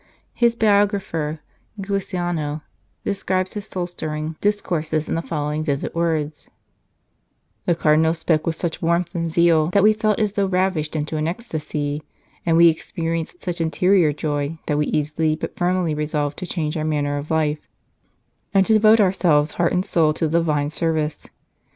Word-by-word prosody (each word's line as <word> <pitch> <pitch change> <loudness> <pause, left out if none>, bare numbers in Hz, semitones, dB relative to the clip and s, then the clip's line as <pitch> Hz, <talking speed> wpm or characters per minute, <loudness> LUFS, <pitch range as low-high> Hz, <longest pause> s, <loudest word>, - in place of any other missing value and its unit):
His 235 -1 +2
biographer, 200 -8 +1 0.4
Giussano, 175 -6 -2 0.4
describes 185 -1 -1
his 205 -1 -6
soul 180 -2 -3
stirring 155 -2 -5
discourses 160 -7 0
in - - -2
the 165 - 0
following 150 -1 -2
vivid 140 -3 -2
words: 160 -3 -2 0.6
" - - -47
The 175 - +3
Cardinal 160 0 +3
spoke 160 -1 0
with 165 - 0
such 170 0 -3
warmth 170 0 0
and 165 -1 -2
zeal 165 -1 +3
that 190 +3 +2
we 215 +1 +6
felt 215 -1 +1
as 210 -2 +1
though 200 -1 0
ravished 185 -5 0
into 155 +1 -2
an 155 +1 -1
ecstasy, 155 -7 -3 0.5
and 165 -1 +4
we 170 0 +8
experienced 165 +1 -2
such 175 -2 -2
interior 175 0 +3
joy 145 +1 -2
that 150 -1 0
we 150 - +1
easily 155 +1 0
but 155 - -6
firmly 180 -2 0
resolved 150 -1 -2
to 185 - -5
change 155 -5 -2
our 155 - -2
manner 145 -2 0
of 145 - -8
life, 155 -1 +1 1.0
and 195 0 +5
to 220 - +3
devote 215 +1 +6
ourselves 175 -6 +3
heart 170 -1 0
and 180 +1 0
soul 155 -3 +2
to 160 - 0
the 165 +2 +2
Divine 150 -3 0
service. 160 -2 -1
165 Hz, 165 wpm, -22 LUFS, 155-185 Hz, 1.0 s, we